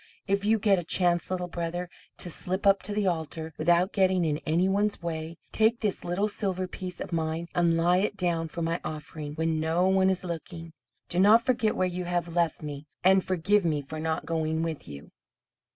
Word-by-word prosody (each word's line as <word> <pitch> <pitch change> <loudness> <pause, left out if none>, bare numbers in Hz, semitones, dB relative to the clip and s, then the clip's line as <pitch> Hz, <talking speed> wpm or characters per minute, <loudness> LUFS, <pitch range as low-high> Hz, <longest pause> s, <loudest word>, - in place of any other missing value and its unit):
if 200 0 0
you 220 +2 +3
get 200 -3 +3
a - - -4
chance, 175 0 +2
Little 180 -1 -2
Brother, 175 +1 -3 0.3
to 175 - -2
slip 185 +5 -3
up 195 0 +5
to 200 - -3
the 205 0 0
altar 160 -2 -2
without 175 +3 +3
getting 185 -3 +3
in 150 -1 0
any 170 +4 +2
one's 205 +2 +1
way, 160 0 -4
take 225 +2 +3
this 210 -3 -1
little 180 +4 0
silver 190 -3 -2
piece 180 -1 -7
of - - -6
mine, 160 +1 -1
and 170 -1 +2
lay 175 +2 +3
it 205 0 -1
down 170 -3 0
for 170 +1 -5
my 165 +1 -1
offering, 150 -1 -6
when 160 0 0
no 165 +3 +2
one 190 0 +4
is 190 0 0
looking. 165 -1 -6 0.3
Do 175 - 0
not 215 +4 +6
forget 240 -4 +1
where 185 - +1
you 180 0 -4
have 175 -1 -2
left 170 -2 +1
me, 145 0 -6 0.2
and 190 +1 +5
forgive 190 +3 +2
me 155 -3 +1
for 150 +3 -7
not 160 0 -2
going 160 -1 -1
with 160 -3 -4
you." 70 -1 -10
175 Hz, 205 wpm, -27 LUFS, 160-190 Hz, 0.3 s, not